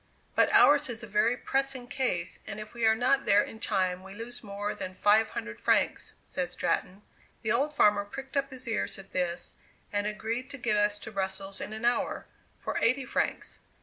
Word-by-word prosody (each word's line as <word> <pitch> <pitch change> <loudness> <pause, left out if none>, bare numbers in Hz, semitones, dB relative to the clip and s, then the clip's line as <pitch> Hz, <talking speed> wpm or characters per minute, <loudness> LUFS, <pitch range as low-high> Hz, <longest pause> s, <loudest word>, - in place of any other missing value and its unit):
"But - - +4
ours 290 -1 +6
is 235 -1 -5
a - - -6
very 215 +4 +2
pressing 270 -2 -1
case, 185 -10 -1
and 200 - -5
if 215 +1 -8
we 235 -1 +2
are 220 - +5
not 260 +4 +2
there 205 +1 +5
in 220 - -9
time 185 -4 0
we 190 +1 -11
lose 235 +3 -7
more 205 0 -3
than 185 0 -6
five 215 +3 +4
hundred 110 - -6
francs," - - +1
said - - -3
Stratton. 195 +3 -1 0.4
The 220 - 0
old 275 +6 +2
farmer 210 -7 +4
pricked 270 +7 -9
up 275 0 +1
his 260 -2 -9
ears 225 - -1
at 195 0 -12
this, 175 -1 -2 0.4
and 205 0 +1
agreed 230 +4 -3
to 285 - -7
get 240 -4 0
us 210 0 +2
to 210 +2 -9
Brussels 195 0 -3
in - - -5
an 220 +2 -4
hour, 240 0 +1 0.3
for - - -2
eighty 255 +3 +2
francs. - - -2
215 Hz, 200 wpm, -29 LUFS, 200-245 Hz, 0.4 s, ours